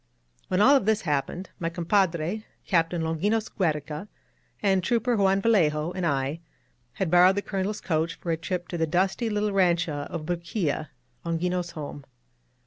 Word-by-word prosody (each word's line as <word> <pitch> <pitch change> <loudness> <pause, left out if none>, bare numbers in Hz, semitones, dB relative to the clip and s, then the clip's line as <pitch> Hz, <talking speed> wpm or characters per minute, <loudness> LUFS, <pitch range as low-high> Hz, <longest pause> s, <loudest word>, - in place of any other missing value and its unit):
When 185 +1 +1
all 275 +4 +7
this 220 -1 +1
happened, 155 +4 -2
my 165 - -1
compadre. 175 +2 0 0.2
Captain 165 -2 +1
Longinos 205 +8 0
Giiereca, 155 -1 -2 0.6
and 190 -2 +3
Trooper 240 +3 +1
Juan 195 -1 +3
Vallejo, 165 -8 +2
and 180 -2 -2
I, 140 +2 -1 0.5
had 175 +4 -2
borrowed 180 +2 +6
the 200 - -1
Colonel's 200 +1 -2
coach 165 -1 -1
for 170 - -4
a - - +2
trip 175 +1 -3
to 175 - -4
the 160 - +1
dusty 190 +8 +1
little 210 0 0
rancho 170 -6 +1
of 165 -3 -5
Bruquilla, 170 -3 -2 0.2
— 120 - -42
^Longinos' 175 +1 -1
home. 145 -2 -7
175 Hz, 155 wpm, -26 LUFS, 160-195 Hz, 0.6 s, all